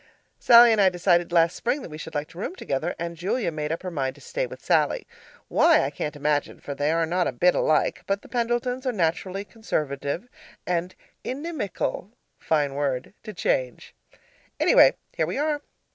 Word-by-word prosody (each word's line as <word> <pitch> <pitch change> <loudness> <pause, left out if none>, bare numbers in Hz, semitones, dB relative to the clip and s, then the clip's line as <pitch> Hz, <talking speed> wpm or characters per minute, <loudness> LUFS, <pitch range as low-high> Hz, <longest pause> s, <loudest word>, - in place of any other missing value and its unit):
Sallie 235 0 +8
and 220 -2 +3
I 190 - +6
decided 175 -1 +1
last 170 0 +3
spring 260 +3 -1
that - - -9
we 155 - -8
should - - -8
like 145 +1 -2
to 170 - -12
room 335 - -4
together, 155 - -3
and 170 0 -4
Julia 185 +4 -1
made 150 -1 -3
up 165 - -3
her 185 - -4
mind 135 -4 -2
to - - -17
stay - - -3
with - - -12
Sallie - - +2 0.4
why, - - +4
I - - -2
can't 150 - -4
imagine, 145 0 -1
for 140 - -6
they 145 +2 0
are 165 0 +2
not 175 +2 0
a - - -1
bit 175 +9 +3
alike; 155 - +1
but 195 +1 -1
the - - -13
Pendletons 245 +2 -1
are - - +2
naturally 185 0 -1
conservative 155 - -3 0.4
and 180 +1 -2 0.3
inimical 255 - -4 0.3
(fine 145 -3 0
word!) 135 -1 -2
to 215 - -8
change. 130 - -2 0.7
Anyway, - - +6 0.2
here 160 - 0
we 175 - -3
are. 295 0 0
175 Hz, 190 wpm, -25 LUFS, 150-230 Hz, 0.7 s, Sallie